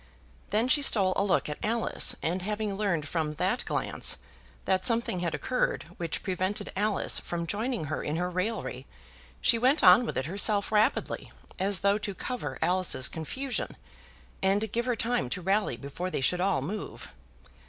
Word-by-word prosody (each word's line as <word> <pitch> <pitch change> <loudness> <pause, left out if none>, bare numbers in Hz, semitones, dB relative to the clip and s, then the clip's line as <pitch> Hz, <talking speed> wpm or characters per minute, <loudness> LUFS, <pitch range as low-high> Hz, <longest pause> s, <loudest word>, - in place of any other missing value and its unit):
Then 220 +4 +2
she 290 +3 +4
stole 195 -9 +6
a 195 - +2
look 200 - +1
at 150 - -5
Alice, 230 +1 +2
and 175 +5 -1
having 210 +1 -2
learned 185 -7 -1
from 155 -1 -2
that - - 0
glance - - 0 0.5
that 185 -1 +1
something 230 -6 +1
had 170 -2 -1
occurred 255 - -1
which 170 -2 -3
prevented 185 +1 -2
Alice 205 +1 0
from 170 -1 -4
joining 220 +5 -2
her 155 +1 -3
in 150 - -2
her 180 +2 -1
raillery, 185 - -3 0.5
she 230 - +3
went 260 +5 +3
on 185 +6 +8
with - - -3
it 130 - -1
herself 200 +5 0
rapidly, 215 0 +1 0.3
as 195 0 +2
though 200 +1 +3
to 200 -2 -5
cover 250 +5 -4
Alice's 180 -7 +2
confusion, 255 - -4 0.6
and 200 +2 +1
give 235 +2 -1
her 245 - +1
time 230 - -1
to 150 - -2
rally 195 +4 0
before 140 +6 -5
they 180 - -2
should 180 +7 +1
all 190 -8 +1
move. 200 +8 -6
195 Hz, 170 wpm, -28 LUFS, 175-220 Hz, 0.6 s, on